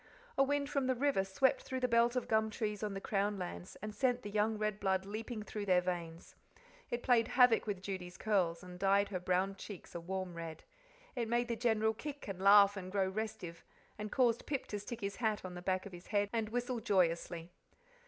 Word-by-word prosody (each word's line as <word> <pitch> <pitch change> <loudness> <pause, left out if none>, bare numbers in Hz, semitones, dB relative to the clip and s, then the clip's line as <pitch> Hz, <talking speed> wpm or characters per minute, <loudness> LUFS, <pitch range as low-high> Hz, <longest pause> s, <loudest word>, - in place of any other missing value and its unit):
A - - +3
wind 280 +1 +2
from 280 -3 0
the 260 - +2
river 270 -6 +2
swept 225 +8 +2
through 260 0 -4
the 250 - +3
belt 235 +1 +3
of 250 - -1
gum 220 0 +2
trees 210 -2 -3
on 210 -2 -2
the - - -3
Crown 200 +1 0
lands, 180 0 -6
and 215 0 -4
sent 250 +2 +1
the 205 - -6
young 215 +1 +1
red 215 -1 -1
blood 190 -1 +1
leaping 215 +2 -5
through 210 -1 -5
their 180 -1 +5
veins; 175 -2 -4 0.6
it 240 0 -3
played 235 -3 +4
havoc 245 -3 +5
with 195 -3 -3
Judy's 185 -2 -5
curls, 185 -6 +1
and 180 0 -10
dyed 200 +1 +3
her 185 -3 -2
brown 185 +2 0
cheeks 195 -2 -9
a 170 - -4
warm 185 +1 -4
red; 165 -2 -7 0.5
it 235 -3 -1
made 240 +1 +1
the 235 - 0
General 220 -1 +2
kick 285 +5 -7
and 190 -2 -5
laugh 200 0 +7
and 185 -1 -6
grow 195 -1 +1
restive, 195 -5 -5 0.4
and 210 0 -4
caused 240 -3 +2
Pip 280 -3 -2
to 205 - -3
stick 230 +3 -7
his 200 0 -3
hat 220 -4 0
on 180 - -6
the 175 - -7
back 185 +1 -1
of 200 - -8
his 175 +1 -11
head 205 -1 +1
and 225 -2 0
whistle 245 +1 -2
joyously. 175 -5 0
205 Hz, 220 wpm, -35 LUFS, 185-235 Hz, 0.6 s, laugh